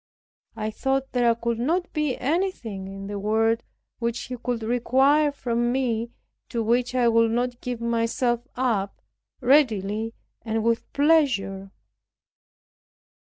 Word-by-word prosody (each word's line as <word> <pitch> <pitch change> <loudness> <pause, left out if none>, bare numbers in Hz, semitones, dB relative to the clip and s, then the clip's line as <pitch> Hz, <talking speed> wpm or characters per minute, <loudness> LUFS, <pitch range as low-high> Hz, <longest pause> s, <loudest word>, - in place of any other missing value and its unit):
I 215 -1 -3
thought 270 +3 -1
there 240 -2 +3
could 230 0 -2
not 340 +8 0
be 300 -4 0
anything 260 - -2
in 195 0 -7
the 205 0 -4
world 225 +3 +2 0.4
which 235 0 -1
He 255 - -5
could 245 -1 -3
require 265 +6 +3
from 240 -3 -1
me, 240 -3 0 0.4
to 230 -1 -1
which 245 +3 +1
I 245 -2 +3
would 230 0 +4
not 245 +1 -1
give 245 -2 -4
myself 235 +1 0
up 225 -6 -1 0.4
readily 225 -5 +2 0.3
and 225 -1 -2
with 230 0 0
pleasure. 235 -11 +2
235 Hz, 125 wpm, -25 LUFS, 225-260 Hz, 0.4 s, would